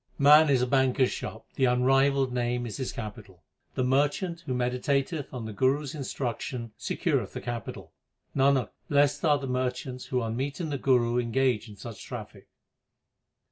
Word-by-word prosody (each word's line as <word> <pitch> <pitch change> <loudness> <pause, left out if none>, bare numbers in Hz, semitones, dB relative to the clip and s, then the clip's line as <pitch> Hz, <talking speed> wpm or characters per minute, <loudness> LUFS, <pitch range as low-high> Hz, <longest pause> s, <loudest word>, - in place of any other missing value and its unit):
Man 150 +2 +7
is 130 -3 +3
a - - +3
banker 130 0 +2
s 125 - +2
shop, - - -6
the 130 - +3
unrivalled 135 +1 +3
Name 120 0 -1
is 110 -4 -5
his 130 - -3
capital. 105 - -8 0.3
The 130 - +1
merchant 145 +7 +1
who 130 - -1
meditateth 135 +4 -1
on 125 -4 -5
the 110 - -6
Guru 135 +6 +2
s 140 - -6
instruction 125 -4 -4
secureth - - -1
the - - -4
capital. 120 -3 -6 0.4
Nanak, 135 -3 +3 0.2
blest 145 0 +3
are 150 -3 +4
the 140 - -5
merchants 125 0 -3
who 130 - -1
on 115 0 -3
meeting 140 +6 -3
the 140 -2 -2
Guru 120 -2 +3
engage 120 -2 0
in 105 - -11
such 105 +1 -9
traffic. - - -9
130 Hz, 170 wpm, -28 LUFS, 120-140 Hz, 0.4 s, Man